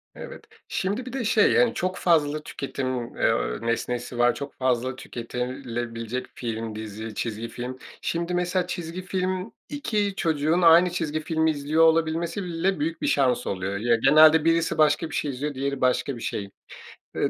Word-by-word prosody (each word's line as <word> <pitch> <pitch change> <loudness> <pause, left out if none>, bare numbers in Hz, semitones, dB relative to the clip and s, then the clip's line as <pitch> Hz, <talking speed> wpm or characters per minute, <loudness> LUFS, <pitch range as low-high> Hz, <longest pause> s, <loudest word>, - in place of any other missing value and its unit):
Evet. - - -9 0.2
Şimdi 205 +7 -2
bir 255 - -8
de, 265 -3 -2
şey, 215 -1 +4
hani, 245 -1 +4
çok 185 -4 -2
fazla 155 -3 +2
tüketim, 130 -3 -4
eee, 115 - +1
nesnesi 120 +1 -2
var, 120 0 +4
çok 140 -1 -6
fazla 130 0 0
tüketilebilecek 120 -1 -5
film, 115 -2 -4
dizi, 110 0 -6
çizgi 115 0 -3
film. 125 +2 -6 0.2
Şimdi, 170 +1 -2
mesela, 180 +1 0
çizgi 175 +1 -5
film, 185 +2 -2 0.2
2 215 -9 -1
çocuğun 160 +2 +1
aynı 170 +2 +7
çizgi 155 -3 -2
filmi 160 0 +1
izliyor 150 +2 +1
olabilmesi 165 +3 +2
bile 175 0 -1
büyük 165 +2 -2
bir - - 0
şans 130 -3 +2
oluyor. 95 +1 -2
Ya, 115 +2 +2
genelde 155 +5 +6
birisi 165 0 +2
başka 155 +1 +3
bir - - -6
şey 145 - -1
izliyor, 145 +3 -4
diğeri 140 0 -3
başka 130 +1 +1
bir 115 - -9
şey. 100 -1 -4 0.7
Eee, - - +1
150 Hz, 165 wpm, -25 LUFS, 120-170 Hz, 0.7 s, aynı